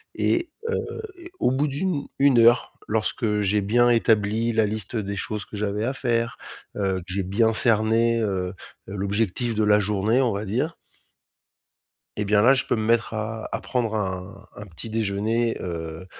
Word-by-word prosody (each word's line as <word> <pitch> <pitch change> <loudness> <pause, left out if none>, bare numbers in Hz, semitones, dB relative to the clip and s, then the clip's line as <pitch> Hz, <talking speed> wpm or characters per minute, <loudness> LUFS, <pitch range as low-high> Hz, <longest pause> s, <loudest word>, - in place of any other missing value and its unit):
et 345 -1 +1 0.2
heu, 460 - -3 0.2
et 350 0 -12
au - - +2
bout 140 +3 +1
d'une 145 +1 -2
une 135 -3 +5
heure 120 +2 +4
lorsque 105 -1 0
j'ai 105 +1 +1
bien 120 +5 +3
établi 115 -1 +2
la 110 -1 +3
liste 105 +1 -4
des 100 -2 -2
choses 105 +1 -4
que - - -10
j'avais 105 +1 -1
à 130 - -1
faire, 115 -3 -1 0.4
heu, 95 -2 0
que - - -10
j'ai 100 0 -1
bien 110 +5 +2
cerné, 115 +1 +3
heu 95 -4 -1 0.4
heu, - - -7
l'objectif 105 +4 -1
de 110 - +1
la 105 0 +5
journée, 105 +4 +1
on 120 -4 +1
va 100 +2 -3
dire 125 +11 -1 1.4
et 105 - -1
bien 105 0 +4
là 125 +4 +7
je 135 - 0
peux - - +1
me 110 - -2
mettre 115 0 +1
à 110 +1 -4
à - - -2
prendre 120 -4 -1
un 100 0 -4
un 105 - -9
petit 95 +5 -8
déjeuner, 110 +2 0
heu, 80 -1 -6
110 Hz, 180 wpm, -24 LUFS, 100-120 Hz, 1.4 s, là